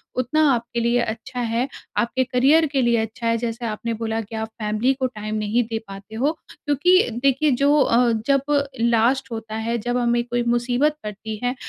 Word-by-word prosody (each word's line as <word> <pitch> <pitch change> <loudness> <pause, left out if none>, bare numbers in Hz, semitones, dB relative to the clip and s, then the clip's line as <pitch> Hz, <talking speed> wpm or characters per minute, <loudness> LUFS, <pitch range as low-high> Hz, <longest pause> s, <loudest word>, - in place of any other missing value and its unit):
उतना 255 +5 +1
आपके 235 0 -2
लिए 235 +1 +2
अच्छा 235 +3 -5
है। 235 +2 0 0.3
आपके 250 +2 +1
करियर 270 +6 +3
के 240 -3 +3
अच्छा 225 +1 -3
है, 230 0 +2
जैसे 235 0 -4
आपने 230 +1 -3
बोला 225 0 -2
कि 220 +1 -9
आप 220 0 -3
फैमिली 215 +5 +1
को 260 -1 -1
टाइम 215 -3 -6
नहीं 215 +3 +1
दे 225 - -1
पाते 195 +2 -10
हो, 270 +7 +1 0.2
क्योंकि 310 +4 +3
देखिए 275 +2 +3
जो 280 +3 +3
अ, 240 -1 +3 0.2
जब 275 -1 +3 0.4
लास्ट 235 +3 +2
होता 225 -1 -6
है, 230 +2 -1
जब 245 +2 -2
हमें 240 0 +1
कोई 240 0 -2
मुसीबत 250 +5 +1
पड़ती 215 +1 -6
है, 245 +1 0
235 Hz, 185 wpm, -22 LUFS, 225-255 Hz, 0.4 s, करियर